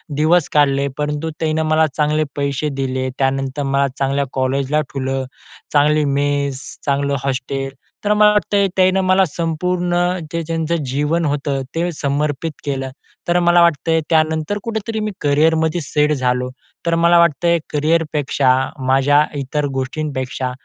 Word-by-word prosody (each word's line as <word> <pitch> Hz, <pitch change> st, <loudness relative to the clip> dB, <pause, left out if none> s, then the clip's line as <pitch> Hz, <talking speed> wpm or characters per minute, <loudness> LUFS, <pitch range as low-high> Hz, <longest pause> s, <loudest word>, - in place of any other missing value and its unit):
दिवस 155 Hz, +2 st, +3 dB
काढले. 140 Hz, -1 st, +3 dB
परंतु 150 Hz, +2 st, -2 dB
त्यांनं 160 Hz, 0 st, 0 dB
मला 155 Hz, 0 st, +4 dB
चांगले 150 Hz, 0 st, +2 dB
पैसे 140 Hz, +1 st, -1 dB
दिले. 130 Hz, 0 st, -2 dB
त्यानंतर 135 Hz, +1 st, -1 dB
मला 140 Hz, 0 st, +1 dB
चांगल्या 140 Hz, +1 st, 0 dB
कॉलेजला 135 Hz, +3 st, 0 dB
ठेवलं. 135 Hz, -1 st, -2 dB, 0.5 s
चांगली 150 Hz, +1 st, +3 dB
मेस, 140 Hz, -1 st, 0 dB, 0.3 s
चांगलं 140 Hz, 0 st, 0 dB
हॉस्टेल 135 Hz, 0 st, -3 dB, 0.3 s
तर 210 Hz, -, +3 dB
मला 210 Hz, 0 st, +5 dB
वाटतं 210 Hz, 0 st, +1 dB
आहे 200 Hz, -1 st, +3 dB
त्यांनं 185 Hz, +1 st, +4 dB
मला 185 Hz, +1 st, +4 dB
संपूर्ण 175 Hz, +2 st, -1 dB, 0.4 s
जे 170 Hz, -, -2 dB
त्यांचं 165 Hz, 0 st, -1 dB, 0.2 s
जीवन 150 Hz, +5 st, 0 dB
होतं 145 Hz, -1 st, -1 dB
ते 175 Hz, +2 st, 0 dB
समर्पित 145 Hz, +2 st, -1 dB
केलं. 135 Hz, -2 st, -2 dB, 0.4 s
तर 175 Hz, +1 st, +3 dB
मला 175 Hz, 0 st, +4 dB
वाटतं 165 Hz, -2 st, +2 dB
आहे 160 Hz, 0 st, +3 dB
त्यानंतर 160 Hz, +3 st, +1 dB
कुठेतरी 220 Hz, -1 st, -3 dB
मी 215 Hz, 0 st, -2 dB
करिअरमध्ये 160 Hz, +3 st, +2 dB
सेट 150 Hz, +1 st, +1 dB
झालो. 125 Hz, -2 st, 0 dB, 0.4 s
तर 170 Hz, 0 st, +2 dB
मला 170 Hz, +1 st, +4 dB
वाटतं 170 Hz, 0 st, +2 dB
आहे 170 Hz, 0 st, +3 dB
करिअरपेक्षा 150 Hz, -3 st, +1 dB, 0.4 s
माझ्या 140 Hz, +3 st, +4 dB, 0.2 s
इतर 145 Hz, +2 st, -2 dB
गोष्टींपेक्षा 130 Hz, -2 st, -3 dB
150 Hz, 140 wpm, -18 LUFS, 140-165 Hz, 0.5 s, मला